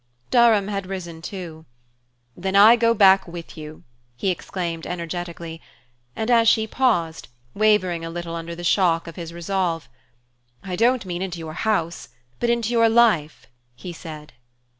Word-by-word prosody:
Durham 230 -5 +5
had 200 -2 -3
risen 170 -4 -6
too. 165 -3 -8 0.7
"Then 190 +2 -3
I 210 +4 +8
go 230 0 +2
back 195 -2 +5
with 170 -1 -9
you!" 155 0 -10 0.3
he 190 +10 0
exclaimed 170 -2 -5
energetically; 170 -1 -6 0.5
and 220 +2 -1
as 230 -1 +5
she 220 -1 +3
paused, 210 -10 0 0.3
wavering 200 -5 +2
a 165 - -5
little 170 0 -6
under 170 0 -5
the 175 - -8
shock 170 -1 +2
of 165 - -9
his 170 -2 -7
resolve: 170 -1 -2 0.8
"I 185 -2 -4
don't 235 +2 +2
mean 175 -1 -4
into 185 -2 -4
your 160 -1 -7
house 170 -6 -2 0.3
but 240 - 0
into 235 -1 0
your 230 -1 +4
life!" 220 -10 +2 0.3
he 175 +8 -8
said. 155 -3 -10
180 Hz, 155 wpm, -23 LUFS, 165-215 Hz, 0.8 s, I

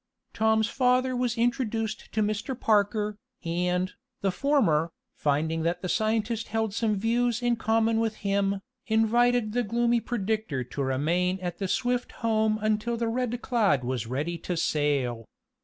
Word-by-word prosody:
Tom's 220 0 +3
father 255 0 +2
was 245 -1 -1
introduced 230 -2 -1
to 215 - +1
Mr. 215 +5 -2
Parker, 210 0 +1 0.3
and, 180 +2 0 0.3
the 195 -2 +1
former, 185 - +2 0.2
finding 155 +3 0
that 170 +2 -1
the - - -1
scientist 220 +3 0
held 220 -1 -1
some 220 -1 +1
views 235 +3 +1
in 240 0 +3
common 225 0 +2
with 225 -1 0
him, 200 0 +1 0.3
invited 230 +1 +3
the 245 - +2
gloomy 235 +2 +1
predictor 215 - -2
to 125 +3 -6
remain 170 +8 +1
at 180 -2 -5
the 195 - -1
Swift 245 +4 -1
home 220 -1 +2
until 215 +2 0
the 230 0 -1
Red 245 +1 -2
Cloud 205 - +2
was 125 -2 -2
ready 150 +8 -2
to 180 - -3
sail. 140 -8 0
215 Hz, 150 wpm, -27 LUFS, 180-235 Hz, 0.3 s, Tom's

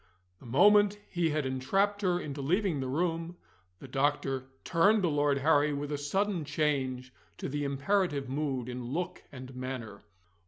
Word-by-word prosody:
The - - -13
moment 205 - +5
he 170 -2 +1
had 150 -2 -1
entrapped 195 +11 0
her 180 -3 +1
into 145 -4 -5
leaving 175 +2 +1
the 130 - -2
room, 165 +4 -1 0.4
the 135 - -11
doctor 135 -1 0 0.2
turned 200 +5 +3
to 175 - +3
Lord 145 -1 +2
Harry 145 +1 +3
with 145 +1 -4
a 145 - -1
sudden 190 +4 0
change 135 -4 -1 0.2
to - - -4
the 145 +1 -2
imperative 140 +1 0
mood 135 -3 -2
in 125 0 -5
look 155 +9 -3
and 130 -1 -9
manner. 125 -5 -6
145 Hz, 160 wpm, -30 LUFS, 130-175 Hz, 0.4 s, moment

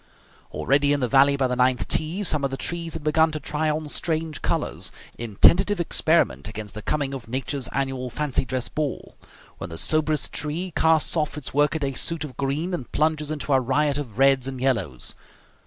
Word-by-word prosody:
Already, 145 +1 +2
in 145 - 0
the 125 - 0
valley 140 +2 +4
by 135 - +1
the 125 - -1
ninth 125 0 +2
tee, 165 +6 0
some 150 -6 0
of 140 - +1
the 135 - -5
trees 170 +1 -2
had 160 - -6
begun 160 +1 +3
to 155 - -3
try 150 +2 -1
on 155 0 -2
strange 160 0 -2
colours, - - -2 0.3
in 115 -3 -6
tentative 190 - +5
experiment 70 - +1
against 105 -1 -7
the 110 - -7
coming 140 +3 -1
of 130 -4 -7
nature's 130 +2 -2
annual 135 -2 -2
fancy 150 +1 -1
dress 130 -1 -3
ball, 150 -3 -4 0.4
when 85 - -6
the 80 - -7
soberest 155 - +1
tree 165 +5 -2
casts 160 0 +2
off 150 -2 -1
its 150 - -7
workaday 145 -1 +1
suit 165 +3 +2
of 140 -5 -8
green 145 +7 -2
and 135 -8 -5
plunges 155 -1 0
into 150 -2 -2
a 135 - +5
riot 140 +3 +1
of 120 -7 -7
reds 135 -1 +4
and 130 -1 -5
yellows. 115 - 0
145 Hz, 195 wpm, -24 LUFS, 130-155 Hz, 0.4 s, tentative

